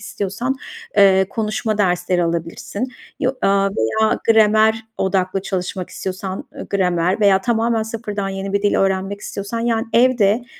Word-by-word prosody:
istiyorsan, 205 +7 -3 0.4
eee, 190 -1 +5
konuşma 215 -1 -2
dersleri 180 -2 +1
alabilirsin 170 +8 -3 0.3
yo 255 -1 +1
ııı, 195 0 +3
veya 215 - +1
gramer 220 0 +5 0.2
odaklı 190 0 0
çalışmak 185 -1 -4
istiyorsan, 190 0 -5
ııı, - - -7
gramer 180 0 +1
veya 195 -2 +5
tamamen 230 0 +1
sıfırdan 215 -3 -4
yeni 195 0 -4
bir 200 - 0
dil 205 - +2
öğrenmek 195 +1 0
istiyorsan, 200 +4 -5
yani, 230 -1 0
evde 235 -2 +3
200 Hz, 135 wpm, -19 LUFS, 190-220 Hz, 0.4 s, eee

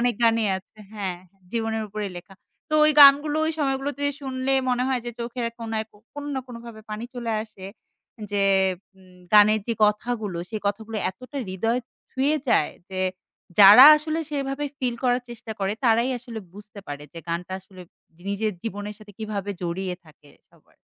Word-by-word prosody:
অনেক 245 -1 +2
গানই 230 -1 +3
আছে 200 +3 -23
হ্যাঁ, 190 -4 -4 0.3
জীবনের 225 -1 -1
উপরে 210 0 -4
লেখা 185 +2 -11 0.3
তো 305 - -1
ওই 305 - +6
গানগুলো 290 +2 +8
ওই 320 - 0
সময়গুলোতে 280 0 -1 0.2
শুনলে 265 0 -1 0.2
মনে 250 0 +1
হয় 260 -2 0
যে - - -2
চোখের 235 0 -3
কোণায় 225 -1 -3 0.3
কোনো 290 0 -6
না 265 - -1
কোনোভাবে 235 -2 -10
পানি 215 +2 -4
চলে 235 -2 -3
আসে, 215 -4 -13 0.7
যে 200 -1 +1 0.5
উম 185 -1 -20 0.2
গানের 215 +1 +6
যে 230 - -1
কথাগুলো 210 -3 -1
সেই 215 - -4
কথাগুলো 220 +2 -3
এতটা 255 +9 -12
হৃদয় 225 +6 0 0.3
ছুঁয়ে 280 +4 +1
যায়। 150 - +3 0.2
যে 185 - -3 0.6
যারা 205 +6 +11
আসলে 310 +1 -2
সেভাবে 275 0 -2
ফিল 250 -2 -1
করার 245 0 +2
চেষ্টা 235 -1 -7
করে 195 0 0
তারাই 235 +2 +3
আসলে 235 -1 -8
বুঝতে 205 +1 -12
পারে 145 0 -6
যে 170 - -9
গানটা 170 +2 -3
আসলে 190 -1 -16 0.5
নিজের 210 +2 -1
জীবনের 205 -1 -5
সাথে 210 -1 -14
কীভাবে 205 -2 -4
জড়িয়ে 180 +2 -3
থাকে 150 -2 -20 0.2
সবার। - - -27
225 Hz, 165 wpm, -24 LUFS, 200-250 Hz, 0.7 s, যারা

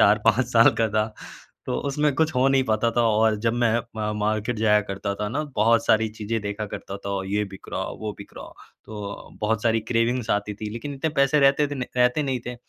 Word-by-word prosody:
4-5 110 +4 +4
साल 115 0 +7
का 110 - +3
था। 110 0 0 0.5
तो - - -2
उसमें 150 +1 +1
कुछ 160 -2 +1
हो 130 +1 +3
नहीं 135 -1 +3
पाता 110 +1 +1
था 120 - +4
और 110 0 +3
जब 115 - +3
मैं 115 0 +3 0.2
म 105 0 -2
मार्केट 110 +2 -1
जाया 105 -1 +4
करता 100 0 -4
था 105 +1 -3
ना 145 +7 -2
बहुत 115 +2 +3
सारी 110 0 +3
चीज़ें 110 +1 -4
देखा 105 +1 -4
करता 100 0 -7
था - - -2
और 95 -1 -2
ये 105 +2 0
बिक 95 -1 -12
रहा - - -1 0.2
वो 105 -1 -3
बिक 100 - -11
रहा। - - -9 0.3
तो 105 -2 -8
बहुत 105 0 0
सारी 115 -1 +2
क्रेविंग्स 115 +1 0
आती 105 0 -1
थी। 105 +1 -6
लेकिन 130 +6 -6
इतने 155 +3 -2
पैसे 140 +2 +4
रहते 140 +2 +4
थे 145 - -4 0.2
रहते 125 +4 +3
नहीं 130 -3 -2
थे 125 - -4
110 Hz, 220 wpm, -24 LUFS, 105-125 Hz, 0.5 s, साल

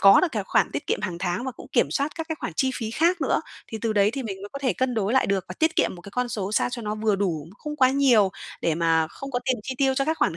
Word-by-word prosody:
có 195 0 +8
được 370 - +2
cái - - -2
khoản - - +2
tiết - - -4
kiệm - - 0
hàng 180 -5 -3
tháng 180 +5 -2
và 260 - -2
cũng - - -12
kiểm - - +3
soát 285 +2 -1
các 325 -1 -5
cái 320 - -2
khoản - - -3
chi 265 - +2
phí 220 -2 -3
khác 340 +8 +2
nữa. - - +2 0.3
Thì 220 - -6
từ 225 0 0
đấy 205 0 +4
thì 270 +2 -4
mình 195 -4 -6
mới 205 - -6
có 275 - -5
thể 270 -2 +1
cân 255 -1 -1
đối 215 0 0
lại 265 - +3
được 195 -2 0
và - - -6
tiết 320 0 +2
kiệm - - +2
một 175 - -11
cái 200 - -10
con 250 0 -1
số 210 -4 -3
sao - - +2
cho 245 -1 -5
nó 210 0 -2
vừa 215 -1 +1
đủ, 170 -7 -1
không 300 -1 -5
quá 260 -3 +5
nhiều 250 -8 +4 0.3
để 165 - +1
mà 165 -1 +2
không 275 +10 -8
có 245 - 0
tiền 260 -2 +1
chi 260 +2 -4
tiêu 270 -1 +3
cho 275 +1 +1
các 315 +2 -1
khoản 165 - +1
230 Hz, 325 wpm, -25 LUFS, 195-275 Hz, 0.3 s, có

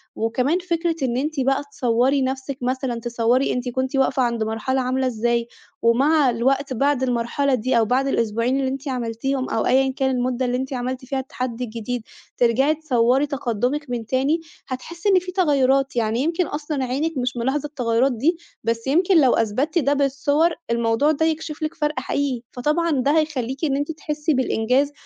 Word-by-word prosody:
وكمان 250 +8 0
فكرة 340 -2 -1
إن 245 -1 0
أنتِ 300 +2 -2
بقى 270 +2 +1
تصوّري 255 +2 +2
نفسِك 265 +1 -3
مثلًا، 255 -1 -2
تصوّري 240 +2 +1
أنتِ 250 0 -2
كنتِ 260 +2 -2
واقفة 270 0 +2
عند 235 -2 0
مرحلة 225 +4 -1
عاملة 255 +1 0
إزاي 235 0 0 0.3
ومع 275 +5 +4
الوقت 265 +3 0
بعد 275 +1 +1
المرحلة 250 +3 0
دي 250 +2 0
أو 225 - +4
بعد 255 +4 +1
الأسبوعين 230 +1 0
اللي 265 - 0
أنتِ 275 +2 -6
عملتيهم 255 +2 -2
أو 225 - 0
أيًا 265 +1 +3
كان 265 -1 +1
المدّة 250 0 0
اللي 250 0 0
أنتِ 265 +1 -4
عملتِ 255 +1 -3
فيها 270 +1 -2
التحدي 255 -2 -4
الجديد 235 +1 -4 0.3
ترجَعي 260 +6 +3
تصوّري 265 -2 +2
تقدُّمِك 265 +1 -2
من 235 -2 -3
تاني، 270 +7 +1 0.3
هتحسّي 335 +9 -4
إن 380 -2 +5
في 365 0 -7
تغيّرات، 275 -7 +2
يعني 225 0 0
يمكن 330 +5 0
أصلًا 295 -2 -3
عينِك 280 +4 -2
مش 250 0 -2
ملاحظة 265 +5 -1
التغيّرات 250 -2 +1
دي، 300 +9 +1 0.3
بس 230 +2 -2
يمكن 350 +5 +4
لو 260 -3 +4
أثبتتِ 260 - +1
ده 285 -1 +2
بالصور 285 +4 +2 0.2
الموضوع 235 +5 +2
ده 315 +1 +1
يكشِف 315 0 -2
لِك 310 +2 -2
فرْق 300 -2 -1
حقيقي، 275 -4 -2
فطبعًا 305 +7 0
ده 280 0 +2
هيخلّيكِ 270 -2 -2
إن 275 -3 +1
أنتِ 290 +3 -1
تحسّي 300 0 -2
بالإنجاز 260 +2 +1
265 Hz, 175 wpm, -22 LUFS, 245-290 Hz, 0.3 s, إن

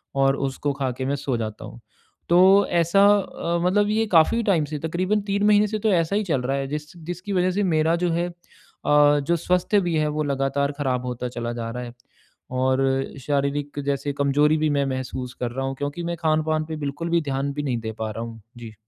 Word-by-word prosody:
और 135 0 +3
उसको 140 +2 -2
खा 135 -2 -2
के 130 - -3
मैं 140 +1 0
सो 135 -4 -2
जाता 110 -2 -5
हूँ। - - -11 0.5
तो 175 - +5 0.3
ऐसा 170 +3 +3
अ, 170 -3 -3
मतलब 205 +3 +2
ये 220 +1 +1
काफ़ी 170 +8 +4
टाइम 170 -8 +2
से 150 +1 -5
तकरीबन 185 +7 0
3 200 +1 0
महीने 210 0 +5
से 215 +1 -3
तो 215 +1 +1
ऐसा 170 +3 +1
ही 215 - 0
चल 150 -8 0
रहा 135 +2 -1
है 135 0 -2
जिस 150 +4 -6
जिसकी 175 +4 -6
वजह 185 0 +2
से 205 +3 0
मेरा 160 -2 +2
जो - - +1
है 170 +1 0
अ, 175 - -12 0.9
जो 165 +5 0
स्वस्थ्य 180 +5 +1
भी 175 -2 -1
है 155 -1 +1
वो 155 - +1
लगातार 140 0 0
खराब 125 -3 -1
होता 125 0 -3
चला 120 -1 -4
जा 115 -1 -4
रहा 125 +1 -5
है। 120 -1 -8 0.7
और 130 +1 +2 0.5
शारीरिक 145 0 -1
जैसे 140 0 -1
कमजोरी 145 +2 +2
भी 155 0 +1
मैं 140 -1 +1
महसूस 130 -1 -4
कर 120 -1 -1
रहा 135 +2 -3
हूँ, 135 - -3
क्योंकि 145 +5 -4
मैं 170 0 -2
खान-पान 155 -1 0
पे 160 - -5
बिल्कुल 150 +3 -4
भी 170 0 +2
ध्यान 140 -1 -2
भी 145 +1 -3
नहीं 130 -4 -1
दे 110 - -4
पा 110 -1 -2
रहा 115 +2 -5
हूँ, 115 -1 -9 0.2
जी। 115 -2 -9
145 Hz, 225 wpm, -23 LUFS, 135-170 Hz, 0.9 s, तो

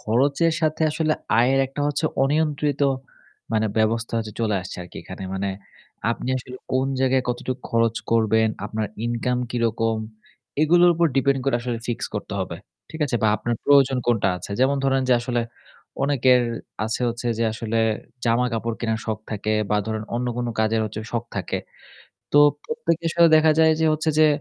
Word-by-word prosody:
খরচের 140 +9 +2
সাথে 155 0 +1
আসলে 155 0 0 0.3
আয়ের 130 +3 +4
একটা 135 +2 -7
হচ্ছে 145 +2 -2 0.2
অনিয়ন্ত্রিত 145 0 +1 0.7
মানে 110 0 +2
ব্যবস্থা 115 +1 0
হচ্ছে 110 -1 -4
চলে 110 -2 +1
আসছে 90 - -8
আরকি 90 - -12
এখানে। 95 +2 -8
মানে 100 +1 -1 0.6
আপনি 120 - -3
আসলে 125 +1 -9 0.2
কোন 130 +1 +2
জায়গায় 130 -1 +3
কতটুকু 125 +1 -3
খরচ 115 0 +2
করবেন, 110 -1 +3 0.2
আপনার 110 0 -2 0.2
ইনকাম 120 +1 -1
কিরকম 115 -2 0 0.6
এগুলোর 175 +3 +5
উপর 170 +1 +3
ডিপেন্ড 135 0 +2
করে 135 -3 +2
আসলে 120 -1 -3
ফিক্স 120 - -2
করতে - - -4
হবে। - - -4 0.3
ঠিক 160 - -8
আছে? 125 - 0
বা 110 - +4
আপনার 120 - -2
প্রয়োজন 135 -2 +5
কোনটা 115 -5 +2
আছে? 90 - -9
যেমন 135 +2 +3
ধরেন 135 -1 +2
যে - - +5
আসলে 120 -1 -1 0.6
অনেকের 130 -3 +4 0.4
আছে 110 +2 -2
হচ্ছে 120 +1 -3
যে 115 - +1
আসলে 115 0 -2 0.5
জামা-কাপড় 115 -1 0
কেনার 110 -2 -1
শখ 110 -2 -2
থাকে 110 0 -2 0.2
বা 105 - +3
ধরেন 110 -1 -3
অন্য 125 +1 -1
কোনো 120 -1 -1
কাজের 110 +1 +2
হচ্ছে 110 +1 -6
শখ 120 -1 -1
থাকে। 95 - -2 0.7
তো 145 - +6 0.3
প্রত্যেকের 165 0 -1
সাথে 170 -1 +6
দেখা 155 0 +5
যায় 160 0 +6
যে 160 - +3
হচ্ছে 155 +1 0
যে 155 - +7
120 Hz, 170 wpm, -23 LUFS, 110-140 Hz, 0.7 s, যে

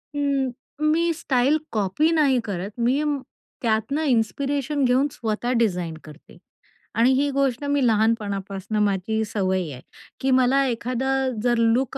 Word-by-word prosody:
हं. 280 -2 0 0.3
मी 325 +3 +2
style 275 -2 +1
copy 215 - +1
नाही 290 -6 +3
करत, 195 -2 -4
मी 255 +5 +2 0.6
त्यातनं 230 +6 0
इन्स्पिरेशन 275 +5 0
घेऊन 255 +3 +3
स्वतः 230 -1 -2
डिझाईन 180 -7 0
करते 155 +1 -15 0.6
आणि 235 +3 +4
ही 280 +2 +2
गोष्ट 270 -1 0
मी 285 -2 +1
लहानपणापासनं 210 -2 0
माझी 205 +2 0
सवय 190 -5 -1
आहे, 130 -2 -9 0.4
की 265 - 0
मला 260 +2 +4
एखादं 255 +1 -1
जर 240 -1 +2
लूक 230 +3 +1
245 Hz, 130 wpm, -23 LUFS, 215-275 Hz, 0.6 s, आणि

